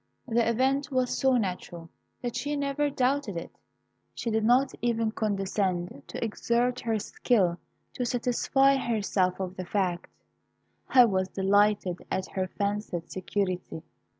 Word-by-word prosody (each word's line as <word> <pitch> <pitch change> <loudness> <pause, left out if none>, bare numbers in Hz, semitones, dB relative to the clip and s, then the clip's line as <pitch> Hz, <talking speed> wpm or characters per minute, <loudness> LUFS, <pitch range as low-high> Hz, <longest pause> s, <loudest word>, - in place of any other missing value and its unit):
The 230 -1 +2
event 270 +5 +1
was 255 -1 +1
so 265 -1 +3
natural, 180 -5 -4 0.4
that 240 -1 -3
she 285 +4 -2
never 285 +1 0
doubted 265 -6 0
it. 170 - -7 0.6
She 230 - -3
did 220 0 +1
not 250 +4 +4
even 230 -2 +1
condescend 195 -6 -1
to - - -5
exert 240 +3 0
her 225 -2 0
skill 195 -5 +1 0.3
to 250 - -2
satisfy 250 +3 +2
herself 205 -7 0
of 185 -1 -4
the 185 - -4
fact. 180 -2 -1 0.8
I 250 -2 +7
was 190 -4 +1
delighted 200 -1 +2
at 190 - -1
her 190 -1 -1
fancied 200 -4 -3
security. 185 -3 -3
220 Hz, 135 wpm, -28 LUFS, 190-250 Hz, 0.8 s, I